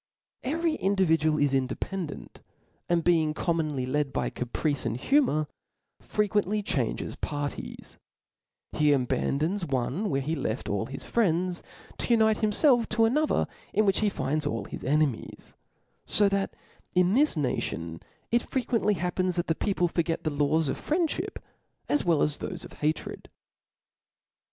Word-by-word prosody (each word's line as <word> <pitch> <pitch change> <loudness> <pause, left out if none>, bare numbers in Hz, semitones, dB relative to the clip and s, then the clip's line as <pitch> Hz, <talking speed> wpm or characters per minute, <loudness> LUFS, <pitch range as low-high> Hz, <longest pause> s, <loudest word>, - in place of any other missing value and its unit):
Every 325 +4 0
individual 165 -6 +2
is 145 -2 +2
independent, 145 +6 -3 0.5
and 170 -1 +2
being 160 -3 +3
eom« 170 0 0
ilionly 140 -5 -2
led 145 +1 0
by - - -1
caprice 135 +3 -2
and 115 0 -2
humour, 245 - +2 0.6
fi'equently 210 0 0
changes 125 - -1
parties; 145 -1 -5 0.7
he 150 -1 +3
abandons 150 +7 0
one 140 - -1
where 135 - +1
he 150 +4 -2
left 115 -7 -2
all 100 +2 -1
his 135 +1 -7
friends, 180 -5 +1 0.4
to - - -2
unite 220 -1 +4
himfelf 235 +3 +3
to 225 +1 +3
another 295 +7 +2 0.3
in 215 - +4
which 195 -1 +3
he 215 - +2
finds 150 -3 -1
all 115 - -2
his - - -8
enemies: 145 -3 -1 0.5
fo 205 - +4
that 195 0 -1 0.4
in 180 +1 +4
this 285 - +3
nation 85 - -2 0.3
it 235 +1 +4
fre 260 - -2
quently 225 -4 +1
happens 180 +1 -1
that 175 - 0
the 160 - +1
people 180 0 0
forget 170 -1 -1
the 155 - 0
laws 150 +2 +2
of. - - -2
friendship, 320 0 -1 0.5
as 295 - +2
well 165 -4 +3
as 150 -1 0
thofe - - -5
of - - -12
hatred. 155 +1 -3
165 Hz, 145 wpm, -28 LUFS, 145-210 Hz, 0.7 s, unite